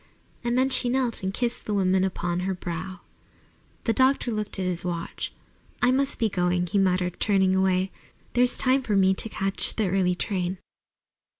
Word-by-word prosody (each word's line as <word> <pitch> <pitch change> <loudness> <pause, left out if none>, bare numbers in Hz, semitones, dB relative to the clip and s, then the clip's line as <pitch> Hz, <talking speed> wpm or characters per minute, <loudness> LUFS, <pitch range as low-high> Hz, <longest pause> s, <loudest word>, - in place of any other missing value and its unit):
And 240 +1 0
then 260 +1 +3
she 245 - +4
knelt 250 -2 0
and 190 0 -2
kissed 240 +4 -1
the 210 - 0
woman 190 -1 +2
upon 175 -2 -1
her 190 +1 -1
brow. 180 +2 -6 0.8
The 225 - +1
doctor 260 -1 +2
looked 215 -2 -3
at 190 - -2
his 180 -2 -1
watch. 170 -1 -4 0.5
"I 245 - +4
must 275 +1 +1
be 225 - +2
going," 180 -2 0
he 200 +3 0
muttered, 180 -2 +1
turning 190 -3 +3
away. 190 0 +1 0.4
"There's 245 0 +3
time 260 +1 +2
for 215 -5 -1
me 190 -1 +4
to 225 - -3
catch 195 -2 -2
the 215 -4 0
early 180 -2 +2
train." 185 -1 -2
190 Hz, 180 wpm, -26 LUFS, 185-235 Hz, 0.8 s, she